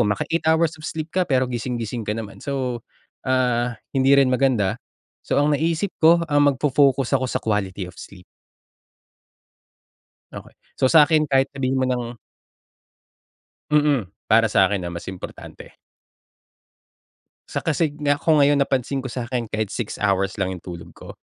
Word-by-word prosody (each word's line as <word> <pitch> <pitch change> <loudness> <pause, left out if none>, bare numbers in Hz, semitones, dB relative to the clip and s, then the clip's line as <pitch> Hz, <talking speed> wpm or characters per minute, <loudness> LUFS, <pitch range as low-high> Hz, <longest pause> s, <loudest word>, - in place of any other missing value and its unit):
maka-8 105 +11 -1
hours 160 0 +2
of 155 - -8
sleep 155 0 -5
ka, 185 0 0
pero 130 -3 +1
gising-gising 120 -2 -4
ka 105 - -1
naman. 110 -3 -7
So, 130 -4 -3 0.4
ah, 125 -2 +1 0.2
hindi 135 +1 +4
rin 135 -2 +4
maganda. 125 -7 +1 0.5
So, - - +1
ang 145 0 +2
naisip 165 +5 -1
ko, 170 +1 +5
um, 145 -1 +4
magfo-focus 135 -1 +2
ako 130 - -2
sa - - -2
quality 100 -3 -2
of 90 - -23
sleep. 90 -2 -12 2.1
Okay. - - -11 0.3
So, 130 - +4
sa'kin 155 0 +5
kahit 135 0 +2
sabihin 135 -1 -1
mo 130 - +1
ng 125 -2 -3 1.5
Mm, 145 -9 +2 0.2
para 115 +1 +4
sakin, 100 -2 +2
ah, - - -4
mas 85 0 -8
importante. 95 -1 -10 1.7
Sa - - -3
kasi 155 -1 0
nga, 145 -1 +2
kung 160 -2 +3
ngayon 145 0 +4
napansin 135 0 -1
ko 130 - -6
sa'kin, 120 -2 -4
kahit 110 -2 -2
6 115 -4 -4
hours 100 -1 0
lang 95 -1 -1
yung 90 - -11
tulog 85 -2 -9
ko - - -11
130 Hz, 150 wpm, -22 LUFS, 110-145 Hz, 2.1 s, ko